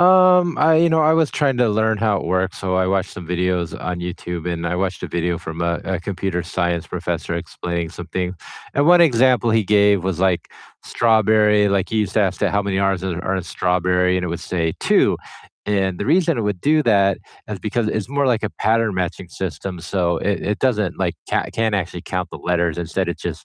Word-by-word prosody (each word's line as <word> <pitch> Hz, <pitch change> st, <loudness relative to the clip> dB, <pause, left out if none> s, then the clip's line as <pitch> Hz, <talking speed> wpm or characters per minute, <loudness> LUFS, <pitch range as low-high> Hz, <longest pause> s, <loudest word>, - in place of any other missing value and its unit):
Um, 180 Hz, -1 st, +5 dB
I 160 Hz, +1 st, +5 dB
you 170 Hz, +1 st, +4 dB
know, 160 Hz, -1 st, +3 dB
I 155 Hz, +1 st, +4 dB
was 160 Hz, -2 st, +2 dB
trying 140 Hz, -4 st, +1 dB
to 120 Hz, -2 st, +3 dB
learn 110 Hz, 0 st, +1 dB
how 110 Hz, -2 st, +1 dB
it -, -, -4 dB
works, 95 Hz, +2 st, -1 dB
so 95 Hz, -1 st, -2 dB
I 95 Hz, 0 st, +2 dB
watched 95 Hz, -1 st, 0 dB
some 90 Hz, -, -9 dB
videos 90 Hz, -1 st, -1 dB
on 90 Hz, -1 st, -4 dB
YouTube, 90 Hz, -1 st, -5 dB
and 85 Hz, 0 st, -4 dB
I 85 Hz, -, -1 dB
watched 95 Hz, 0 st, -2 dB
a -, -, -3 dB
video 85 Hz, 0 st, -2 dB
from 80 Hz, +1 st, -7 dB
a 85 Hz, 0 st, -1 dB
a 95 Hz, -3 st, -2 dB
computer 90 Hz, -1 st, -3 dB
science 85 Hz, -1 st, -2 dB
professor -, -, -3 dB
explaining 85 Hz, 0 st, -4 dB
something, 90 Hz, +2 st, -4 dB, 0.4 s
and 145 Hz, +1 st, +2 dB
one 175 Hz, +1 st, +7 dB
example 125 Hz, -6 st, +4 dB
he 110 Hz, 0 st, +3 dB
gave 100 Hz, -1 st, +3 dB
was, 95 Hz, -2 st, -2 dB
like, 95 Hz, -2 st, +1 dB, 0.4 s
strawberry, 110 Hz, -2 st, +3 dB
like, 100 Hz, -2 st, 0 dB
he 110 Hz, -, -1 dB
used 105 Hz, -3 st, -1 dB
to -, -, +3 dB
ask 95 Hz, -3 st, -1 dB
it -, -, +2 dB
how 100 Hz, -, +1 dB
many 100 Hz, -1 st, -2 dB
R's 95 Hz, -2 st, 0 dB
are 95 Hz, +1 st, -2 dB
in 95 Hz, -, -3 dB
strawberry, 90 Hz, +1 st, +1 dB
and 90 Hz, -, -1 dB
it -, -, -3 dB
would 85 Hz, +1 st, -4 dB
say 85 Hz, -3 st, -2 dB
"2," -, -, +3 dB, 0.5 s
and 95 Hz, -3 st, 0 dB
the 105 Hz, -, -2 dB
reason 165 Hz, -1 st, +2 dB
it -, -, 0 dB
would 105 Hz, -3 st, -2 dB
do 155 Hz, -, +3 dB
that 100 Hz, -5 st, +3 dB, 0.3 s
is -, -, -5 dB
because 120 Hz, -2 st, -1 dB
it's 110 Hz, 0 st, -3 dB
more 140 Hz, 0 st, 0 dB
like 120 Hz, -4 st, +1 dB
a 105 Hz, -, -2 dB
pattern 110 Hz, -1 st, +1 dB
matching 90 Hz, 0 st, -3 dB
system, 95 Hz, 0 st, -5 dB
so 85 Hz, -1 st, -1 dB
it 100 Hz, -1 st, -1 dB
it 105 Hz, -, -2 dB
doesn't, 105 Hz, -9 st, 0 dB
like, 90 Hz, -3 st, -1 dB, 0.2 s
coun -, -, +1 dB
can't 110 Hz, -2 st, 0 dB
actually 90 Hz, -3 st, -3 dB
count 90 Hz, -1 st, -3 dB
the -, -, -7 dB
letters, 85 Hz, -2 st, -1 dB
instead 85 Hz, +2 st, -2 dB
it 85 Hz, -, -4 dB
just -, -, -5 dB
95 Hz, 225 wpm, -20 LUFS, 90-110 Hz, 0.5 s, one